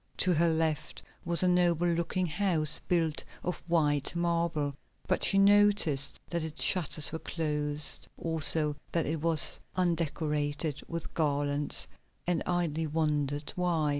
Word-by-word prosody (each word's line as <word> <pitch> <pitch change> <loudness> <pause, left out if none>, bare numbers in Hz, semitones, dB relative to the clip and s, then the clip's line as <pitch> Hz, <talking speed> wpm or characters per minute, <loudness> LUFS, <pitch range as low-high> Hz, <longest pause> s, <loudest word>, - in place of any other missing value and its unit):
To 185 - +3
her 170 +1 +3
left 160 -2 -2 0.2
was 170 0 +3
a - - +3
noble 175 -1 +2
looking 170 +2 0
house 165 -3 +1
built 165 -3 0 0.2
of 180 -2 -3
white 150 -3 +1
marble, 170 -4 -1 0.3
but 185 - 0
she 195 - +4
noticed 200 -8 +4
that 170 -1 -1
its 160 -1 -1
shutters 160 -4 +2
were 160 - -4
closed, 150 -3 -2
also 160 -2 +2 0.2
that 165 -2 +1
it 155 0 -3
was 165 -2 +3 0.2
undecorated 150 -4 -1
with 165 -1 -6
garlands, 145 -2 0 0.4
and 175 -2 0
idly 165 -3 -1
wondered 150 -2 -1
why. 170 -4 0
160 Hz, 135 wpm, -29 LUFS, 150-175 Hz, 0.4 s, she